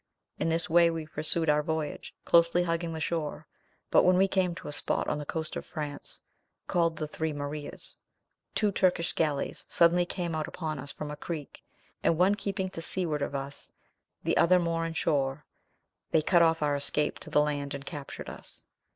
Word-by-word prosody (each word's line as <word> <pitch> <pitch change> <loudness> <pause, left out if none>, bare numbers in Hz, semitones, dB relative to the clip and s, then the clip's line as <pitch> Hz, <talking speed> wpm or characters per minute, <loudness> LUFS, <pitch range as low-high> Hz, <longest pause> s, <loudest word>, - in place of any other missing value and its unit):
In - - +1
this 165 0 +1
way 170 +1 +5
we 165 -1 -3
pursued 160 +1 +5
our 150 0 +4
voyage, 160 -1 -4
closely 170 +1 +4
hugging 165 -1 -1
the 160 - -4
shore; 155 -1 -2 0.5
but - - +7
when 180 0 +4
we 195 +1 +5
came 185 -3 +1
to - - -9
a - - -4
spot 145 - 0
on 150 - -1
the 145 - -7
coast 160 -1 -4
of - - -4
France, 150 -3 -6 0.4
called 165 -2 +1
the 155 - -3
Three 160 +1 -3
Marias, 145 +1 -5 0.6
two 210 -2 +2
Turkish 180 -3 +1
galleys 150 -4 -1
suddenly 175 +1 +4
came 175 -3 -3
out 155 -1 -2
upon 155 -4 -4
us 145 +2 -5
from 150 -1 -6
a - - -5
creek, 150 -1 -6 0.4
and 165 - +2
one 185 +4 +4
keeping 195 -2 -3
to 165 - -6
seaward 165 -3 -1
of 140 - -2
us, 140 +1 -4 0.5
the - - +1
other 180 +2 +6
more 165 -1 0
in 165 - -5
shore, 140 -2 0 0.6
they 155 - +3
cut 175 +1 +4
off 165 -1 +3
our 145 -1 +2
escape 150 +1 +1
to - - -6
the - - +3
land 145 -1 -1
and 140 0 -8
captured 145 -3 -7
us. - - -8
160 Hz, 195 wpm, -29 LUFS, 150-170 Hz, 0.6 s, but